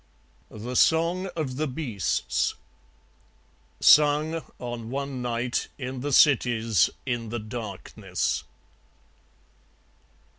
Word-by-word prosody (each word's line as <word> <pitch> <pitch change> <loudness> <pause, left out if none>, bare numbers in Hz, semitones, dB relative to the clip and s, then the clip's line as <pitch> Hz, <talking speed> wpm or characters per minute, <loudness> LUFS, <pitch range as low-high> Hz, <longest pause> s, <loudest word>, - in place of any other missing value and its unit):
The 120 +4 -7
Song 170 +6 +3
of 140 -6 -3
the 155 +1 0
Beasts 125 - -1 1.3
(Sung, 150 +2 +5 0.2
on 120 -2 -6
one 140 0 -4
night, 120 0 -1
in 130 -1 -5
the 145 +3 -3
cities, 115 - +4 0.2
in 120 -4 -2
the 120 - -3
darkness.) 110 -4 -4
125 Hz, 85 wpm, -26 LUFS, 115-145 Hz, 1.3 s, Sung